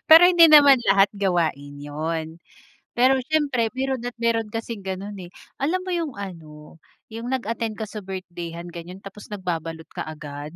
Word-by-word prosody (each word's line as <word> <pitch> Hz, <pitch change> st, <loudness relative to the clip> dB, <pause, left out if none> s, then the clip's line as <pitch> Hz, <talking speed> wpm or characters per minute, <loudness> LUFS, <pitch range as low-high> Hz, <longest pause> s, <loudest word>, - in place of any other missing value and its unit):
Pero 325 Hz, +2 st, +10 dB
hindi 345 Hz, -2 st, +7 dB
naman 285 Hz, -4 st, +8 dB
lahat 195 Hz, +1 st, +5 dB
gawain 170 Hz, -8 st, -1 dB
'yun, 160 Hz, +3 st, -5 dB, 0.6 s
pero 255 Hz, +2 st, +5 dB, 0.2 s
siyempre 280 Hz, -7 st, +1 dB
meron 265 Hz, -2 st, -1 dB
at 245 Hz, 0 st, -5 dB
meron 230 Hz, -1 st, 0 dB
kasing 225 Hz, -1 st, -5 dB
gano'n, 190 Hz, +2 st, -5 dB
eh. -, -, -16 dB, 0.3 s
Alam 350 Hz, +7 st, 0 dB
mo 370 Hz, -, -4 dB
'yung 330 Hz, -6 st, -2 dB
ano 160 Hz, -5 st, -10 dB, 0.3 s
'yung 230 Hz, +2 st, -6 dB
nag-attend 230 Hz, -3 st, -2 dB
ka 220 Hz, -, -4 dB
sa 215 Hz, +1 st, -7 dB
birthday-han 175 Hz, -3 st, -7 dB
ganyon 175 Hz, +3 st, -9 dB
tapos 200 Hz, +1 st, -11 dB
nagbabalot 165 Hz, -5 st, -4 dB
kaagad. 150 Hz, 0 st, -7 dB
200 Hz, 155 wpm, -23 LUFS, 165-245 Hz, 0.6 s, Pero